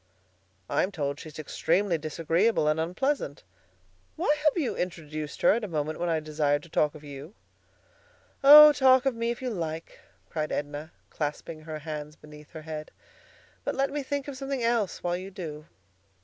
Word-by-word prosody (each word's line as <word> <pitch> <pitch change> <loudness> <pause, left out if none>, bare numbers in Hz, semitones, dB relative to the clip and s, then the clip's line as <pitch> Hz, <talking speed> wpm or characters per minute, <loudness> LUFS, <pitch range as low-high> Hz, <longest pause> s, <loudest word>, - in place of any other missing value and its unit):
"I'm 190 - 0
told 145 -5 -3
she's 155 -1 -10
extremely 170 +4 0
disagreeable 165 +4 +1
and 155 +1 +2
unpleasant. 180 - -1 0.7
Why 295 - +2
have 305 - +4
you 285 - -1
introduced 155 -4 -5
her - - +7
at 230 +2 -1
a - - -2
moment 155 -2 -3
when 175 0 -1
I 160 -1 +1
desired 150 -1 0
to 170 - -14
talk 150 0 +1
of 155 - -12
you?" 145 +6 -10 1.1
"Oh! 300 +2 +11
talk 260 -1 +5
of 270 - +2
me 230 0 -2
if 240 +2 -4
you 250 - -2
like," 165 -4 -5 0.3
cried 155 -1 -3
Edna, 145 +2 -4 0.2
clasping 155 +1 -4
her 155 0 -6
hands 150 -1 -6
beneath 150 -1 -14
her 160 -1 -8
head; 155 -1 -6 0.7
"but - - -2
let 275 +1 0
me 290 0 -2
think 280 0 -3
of 285 - -6
something 270 -2 -3
else 230 -4 0
while 175 0 0
you 185 +2 -6
do." 160 -5 -8
165 Hz, 175 wpm, -27 LUFS, 150-230 Hz, 1.1 s, Oh